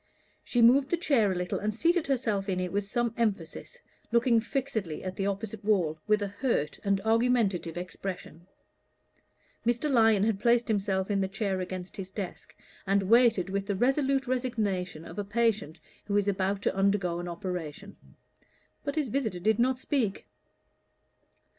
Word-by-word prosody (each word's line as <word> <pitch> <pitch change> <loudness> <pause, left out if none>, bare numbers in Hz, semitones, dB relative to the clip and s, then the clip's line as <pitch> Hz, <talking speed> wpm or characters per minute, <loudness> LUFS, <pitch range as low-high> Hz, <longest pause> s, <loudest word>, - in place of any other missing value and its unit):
She 240 -2 +2
moved 265 +4 +6
the 345 - +1
chair 255 - +2
a - - -1
little 180 0 -2
and 210 +1 -1
seated 335 +5 +2
herself 220 -7 0
in 185 -1 0
it 180 -1 -2
with 200 0 -1
some 235 +2 -1
emphasis, 230 - -2 0.3
looking 235 0 +4
fixedly 225 - -3
at 185 0 -4
the 195 - -1
opposite 200 +1 -4
wall 180 -7 +1
with 210 -1 +3
a - - -1
hurt 200 - -1
and 200 -1 +1
argumentative 220 -7 +1
expression. 180 -2 -7 1.2
Mr. 240 +5 0
Lyon 225 -5 +4
had 215 -2 +1
placed 235 +2 +3
himself 195 -2 0
in 200 -1 +1
the 190 - 0
chair 195 -1 -2
against 185 0 -6
his 190 -1 -6
desk, 190 -2 -7 0.3
and 195 0 +2
waited 230 -6 +4
with 200 0 -2
the 200 - 0
resolute 270 +4 +1
resignation 215 -10 -2
of 170 +5 -8
a - - -1
patient 215 -6 0 0.3
who 205 -1 0
is 205 -1 +1
about 195 0 0
to - - 0
undergo 195 -3 +1
an 175 - -5
operation. 180 0 -6 0.9
But 285 -1 -3
his 300 -5 0
visitor 225 -7 -1
did 215 +4 +1
not 255 +2 +2
speak. 255 -6 -1
205 Hz, 165 wpm, -29 LUFS, 190-235 Hz, 1.2 s, moved